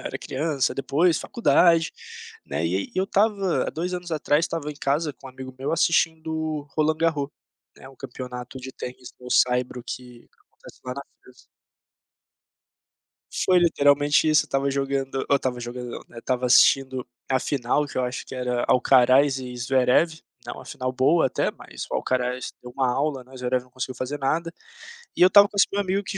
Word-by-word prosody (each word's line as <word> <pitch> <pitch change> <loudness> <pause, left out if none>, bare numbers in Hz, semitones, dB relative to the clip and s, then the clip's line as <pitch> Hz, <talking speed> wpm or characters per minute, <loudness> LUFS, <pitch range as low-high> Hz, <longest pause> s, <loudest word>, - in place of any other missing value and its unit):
era - - -4
criança, 140 -1 -1
depois 155 +5 +2
faculdade, 170 -7 +3 0.5
né, - - -2
e - - 0
aí - - -3
eu 190 - +2
estava 200 -2 +1
há - - -2
2 180 +3 -3
anos 175 -1 -6
atrás 155 0 +1
estava 160 -3 -4
em - - -8
casa 145 +2 -1
com 135 +1 -15
um - - -10
amigo 130 0 -10
meu 135 - -2
assistindo 160 -2 0
Roland 155 0 +2
Garros, 155 -4 0 0.5
né, 130 - -13
o 135 - -17
campeonato 125 0 -8
de 130 +1 -8
tênis 125 0 -8
no 125 - -9
saibro 125 0 +2
que 125 -2 -9 0.2
acontece - - -17
lá 125 - -4
na 140 - -6 0.2
França. 125 -1 -19 2.0
Foi 185 -1 +5
literalmente 145 -2 +3
isso, 155 -1 +4
eu - - -16
estava 135 0 0
jogando 135 -1 -2
eu 140 - +5
estava 125 -2 -3
jogando 120 0 -6
não, - - -6
né, 120 - -12
estava 125 +1 -1
assistindo 130 0 +4 0.2
a 130 - +3
final 140 +2 0
que 140 - -5
eu 130 - +1
acho 125 0 -4
que - - -9
era 125 -1 -1
Alcaraz 130 +2 +4
e 125 -1 -7
Zverev, 130 +6 +2 0.3
né, - - -5
uma - - -10
final 130 0 -4
boa 135 +5 +3
até, - - -1
mas - - -9
o - - -4
Alcaraz 125 0 -1
deu 125 - -9
uma 130 -2 +1
aula, 135 -1 -1
né, 130 - -20
o - - -11
Zverev 125 0 -1
não 125 - -24
conseguiu 130 0 -5
fazer 130 +4 -4
nada, 165 +5 -1 0.6
e - - -3
eu 180 - +9
estava 200 +2 +7
com 205 - -15
esse 200 - +5
meu 205 - 0
amigo 195 +1 -1
que 195 - -5
135 Hz, 195 wpm, -24 LUFS, 125-160 Hz, 2.0 s, eu